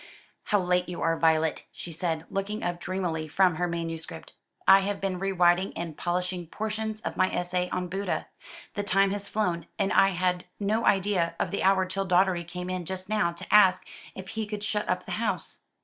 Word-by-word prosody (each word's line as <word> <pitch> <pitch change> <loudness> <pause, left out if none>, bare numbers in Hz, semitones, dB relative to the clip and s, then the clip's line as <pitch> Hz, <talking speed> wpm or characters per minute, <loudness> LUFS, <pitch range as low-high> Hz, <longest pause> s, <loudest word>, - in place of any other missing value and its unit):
"How 205 - +2
late 180 -1 +1
you 175 - -5
are, 165 0 +2
Violet," 160 -1 +2
she 175 - -8
said, 165 -1 -2
looking 205 +3 -3
up 175 0 -2
dreamily 175 -4 -2
from 180 +1 +3
her 175 +1 0
manuscript. 165 -1 -5 0.3
"I 195 - +9
have 200 +1 -2
been 190 -2 -2
rewriting 185 -1 +2
and 170 -2 -4
polishing 180 0 -2
portions 220 +3 -3
of - - -5
my 185 0 +3
essay 180 0 -1
on 180 0 -2
Buddha. 195 +3 -2 0.5
The 205 - -2
time 195 -1 +3
has 200 0 -4
flown, 180 -6 -1
and 195 -2 +1
I 195 - +6
had 180 -1 0
no 215 +3 0
idea 190 -3 +2
of - - -1
the 200 - -2
hour 190 0 +4
till 195 +1 -3
Doddery 180 -1 +3
came 180 +1 -6
in 185 -1 -3
just 185 +2 -5
now 215 -5 +2
to 170 +2 -7
ask 195 -3 +6 0.3
if 190 0 -8
he 220 -1 -3
could 210 -1 -5
shut 210 0 -1
up 180 0 0
the - - -7
house. 195 -7 -2
185 Hz, 195 wpm, -27 LUFS, 175-195 Hz, 0.5 s, I